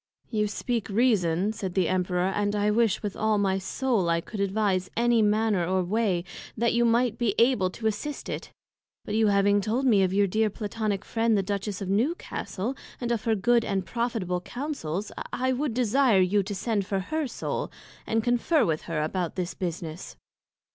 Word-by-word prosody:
You 210 -2 +1
speak 230 +2 -2
Reason, 200 -4 +2
said 190 -4 -5
the 185 -3 +2
Emperor, 180 0 0
and 205 +1 0
I 205 0 +2
wish 225 -2 +2
with 205 -2 -3
all 220 0 +1
my 195 -1 +1
Soul 205 -1 0
I 170 0 +2
could 205 +5 -8
advise 195 -2 0
any 235 -1 +3
manner 210 -2 +2
or 185 +2 +1
way, 190 -2 0 0.3
that 235 +1 +2
you 235 0 +3
might 235 0 +2
be 225 -4 +1
able 230 -6 +3
to 220 +5 -9
assist 220 +7 -2
it; - - -5 0.5
but 210 - -4
you 220 0 +3
having 200 0 +3
told 230 +6 -1
me 215 -6 +5
of 185 -1 +2
your 200 +1 +3
dear 215 +3 +1
Platonick 210 -1 -3
Friend 225 -1 +1
the 195 - +1
Duchess 200 0 -3
of 190 - -5
Newcastle 230 - -2 0.2
and 240 -1 -2
of 230 -2 -1
her 225 -1 +3
good 235 +3 +3
and 195 -3 -1
profitable 225 -7 -2
Counsels, 210 - -4 0.2
I 260 +1 0
would 260 -2 -2
desire 250 -2 +3
you 190 +3 +3
to 200 +1 -5
send 215 0 -1
for 195 - 0
her 310 +9 -2
Soul, - - -4 0.4
and 225 0 +1
conferr 245 +7 +2
with 155 -2 0
her 155 -2 0
about 175 +1 -2
this 180 -1 -3
business. 170 -2 -5
210 Hz, 190 wpm, -27 LUFS, 190-235 Hz, 0.5 s, me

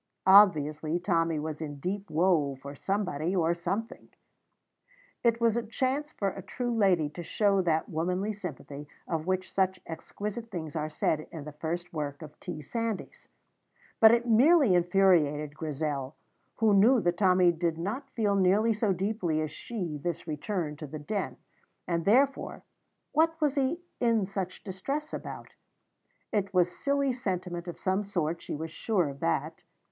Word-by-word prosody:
Obviously, 160 -5 +5
Tommy 165 -3 +1
was 155 +1 -4
in 145 -2 -4
deep 195 +7 -4
woe 155 -4 +2
for 140 +2 -9
somebody 180 0 -1
or 170 -2 +2
something. 195 +7 -4 1.1
It 230 -1 +3
was 230 -1 +3
a 235 - +1
chance 260 +6 -2
for 200 - -1
a 195 - -7
true 245 +4 -3
lady 185 -8 +3
to 160 +4 -8
show 200 +3 +2
that 160 -3 +1
womanly 180 +6 -1
sympathy 150 -7 -7 0.2
of 160 0 -2
which 185 0 -1
such 190 -1 +1
exquisite 210 +7 -6
things 160 -6 -6
are 155 -1 -2
said 155 0 -1
in 160 -3 -7
the 150 - -7
first 170 +4 -4
work 145 -1 -4
of 150 -1 -12
T. 160 -4 -6
Sandys: 230 - -4 0.7
but 220 - +9
it 235 +1 +2
merely 260 - +5
infuriated 175 -5 +3
Grizel, 150 -3 -3 0.4
who 220 -2 +3
knew 230 +6 +6
that 175 -2 0
Tommy 185 -2 +5
did 165 -1 -1
not 225 +11 -4
feel 210 -5 0
nearly 200 +4 +3
so 210 -2 +1
deeply 185 -4 -1
as 155 -1 -2
she 175 -10 -5
this 170 +2 -3
return 155 0 -3
to 155 - -7
the 155 +3 -6
Den, 190 +7 -3 0.5
and, 170 -2 -1
therefore, 265 +6 +2 0.5
what 325 +1 +2
was 295 -4 +2
he 280 +4 0 0.2
in 230 -4 +2
such 190 -1 -5
distress 275 +11 -4
about? - - -7 0.8
It 200 -2 -1
was 180 -1 +3
silly 280 -1 +1
sentiment 180 -6 -3
of 175 - -6
some 190 +1 0
sort, 170 -5 -2
she - - -5
was 160 +2 -5
sure 180 0 0
of 140 -1 -7
that. 85 - -1
185 Hz, 160 wpm, -29 LUFS, 160-215 Hz, 1.1 s, but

